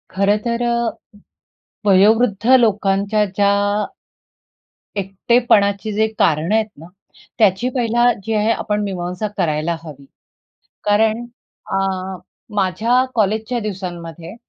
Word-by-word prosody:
खरं 200 +2 +3
तर 235 0 -1
अ, 235 -1 +1 1.0
वयोवृद्ध 205 +2 +4
लोकांच्या 205 -1 +1
ज्या 205 - +3 1.5
एकटेपणाची 200 +1 +1
जे 220 +1 +2
कारणं 160 +5 +2
आहेत 220 -1 +1
ना, 155 - -12 0.5
त्याची 215 +3 +3
पहिला 240 0 +3
जी 225 - -2
आहे 215 +1 +2
आपण 210 -2 -1
मीमांसा 180 +1 -3
करायला 155 +1 0
हवी. 145 -4 -11 0.8
कारण 220 +3 +2 0.5
अ, - - +1 0.8
माझ्या 220 +6 +2
कॉलेजच्या 220 +2 0
दिवसांमध्ये 175 -4 -6
205 Hz, 100 wpm, -19 LUFS, 190-225 Hz, 1.5 s, वयोवृद्ध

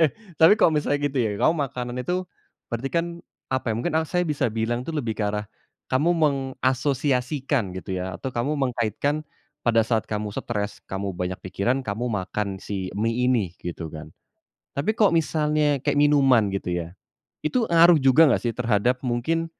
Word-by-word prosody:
Eh, 155 - +5 0.3
tapi 160 +3 +7
kalau 160 - +5
misalnya 145 -1 0
gitu 140 - -9
ya, 115 -4 +2
kamu 160 - +4
makanan 125 -1 -5
itu 180 +5 -2 0.4
berarti 120 +3 -3
kan, 170 0 +2 0.4
apa 130 -3 -1
ya, - - -2
mungkin 120 - -2
saya 180 +2 0
bisa 145 -6 0
bilang 120 +2 -1
tuh 165 - -5
lebih 120 -8 -2
ke 105 - -1
arah, 105 0 -2 0.4
kamu 145 +7 +2
mengasosiasikan, 135 - 0
gitu 95 0 -5
ya, 90 -1 -4
atau 130 - -3
kamu 120 +5 0
mengkaitkan, 130 +3 -1 0.4
pada 115 -1 +4
saat 110 -1 0
kamu 105 -1 -3
stres, 105 0 -3
kamu 95 +1 -3
banyak 90 0 -3
pikiran 120 +8 -1
kamu 110 +1 -3
makan 100 -2 -3
si 95 -2 -4
mie 115 +4 0
ini, 115 -8 +2
gitu 85 -2 -6
kan. 75 -1 -10 0.6
Tapi 150 +11 -1
kok 210 -3 +4
misalnya 150 -3 +1
kayak 145 - +1
minuman, 135 -6 +5
gitu 95 -2 -3
ya, 85 0 -4 0.5
itu 230 +9 +1
ngaruh 170 0 +7
juga 135 +5 +6
nggak - - +1
sih 120 - 0
terhadap 120 +1 +1
mungkin, 160 +8 0
125 Hz, 170 wpm, -24 LUFS, 105-145 Hz, 0.6 s, tapi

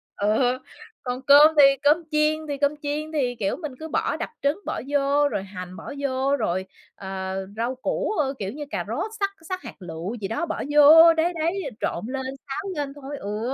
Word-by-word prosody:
ừ, 245 +5 +1 0.4
còn 250 0 -3
cơm 290 +4 +7
thì - - +10 0.2
cơm 300 +4 +4
chiên 305 +1 +1
thì 285 -1 -3
cơm 285 +1 +1
chiên 300 +2 -3
thì, 260 -6 0
kiểu, 200 -4 -1
mình 305 -5 -6
cứ 320 - -6
bỏ - - -1
đập - - -4
trứng 285 +7 +1
bỏ - - -3
vô, 285 0 +2
rồi 195 - -3
hành 185 -2 -8
bỏ - - -8
vô, 275 0 0
rồi, 185 -2 -1 0.3
ờ, 190 -1 -5 0.2
rau 240 +3 -1
củ, 260 - -2
ơ, 275 -2 +1
kiểu 195 -1 -3
như 295 - -6
cà - - -3
rốt 435 - -3
xắt 395 -1 +1 0.2
xắt 370 -1 -3
hạt - - -9
lựu 175 +4 -6
gì 205 -4 -4
đó 225 - -2
bỏ - - -4
vô, 315 +3 +8
đấy, 325 +2 +1
đấy, 340 +5 0 0.2
trộn 175 - -2
lên, 265 +1 -3 0.2
xáo 390 +9 -4
lên 285 -2 -3
thôi, 285 0 -8
ừ, 215 +5 -3
280 Hz, 210 wpm, -24 LUFS, 225-305 Hz, 0.4 s, thì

